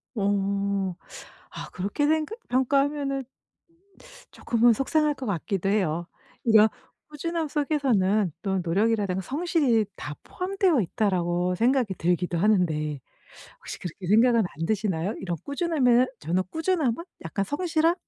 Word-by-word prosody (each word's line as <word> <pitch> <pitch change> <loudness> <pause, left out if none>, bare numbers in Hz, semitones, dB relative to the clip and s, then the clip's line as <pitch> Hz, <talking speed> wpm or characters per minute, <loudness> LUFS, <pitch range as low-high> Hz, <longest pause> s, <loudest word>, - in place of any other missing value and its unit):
어. 200 -2 0 0.6
아 - - -8
그렇게 200 +10 -1
생각 315 +8 0
평가하면은 275 +1 +1 1.1
조금은 235 0 +3
속상할 300 +5 +1
것 265 - -7
같기도 195 -1 -2
해요. 175 -4 0 0.4
이런 220 -2 +6 0.4
꾸준함 325 +2 -3
속에서는 235 - +1
또 195 -2 -1
'노력이라든가 195 +1 +1
성실이 275 - +1
다 150 0 -7
포함되어 365 - +1
있다.'라고 180 -2 0
생각이 240 -2 +2
들기도 175 0 0
하는데 160 -7 +1 0.6
혹시 - - -8
그렇게 180 +1 -7
생각은 230 +3 +5
안 165 -5 -3
드시나요? 200 -3 -1
이런 175 -3 -3
꾸준함에는 280 -5 +2
저는 175 +5 0
꾸준함은 320 -4 0 0.2
약간 195 +4 -2
'성실함? 325 - +1
220 Hz, 305 characters per minute, -26 LUFS, 185-285 Hz, 1.1 s, 이런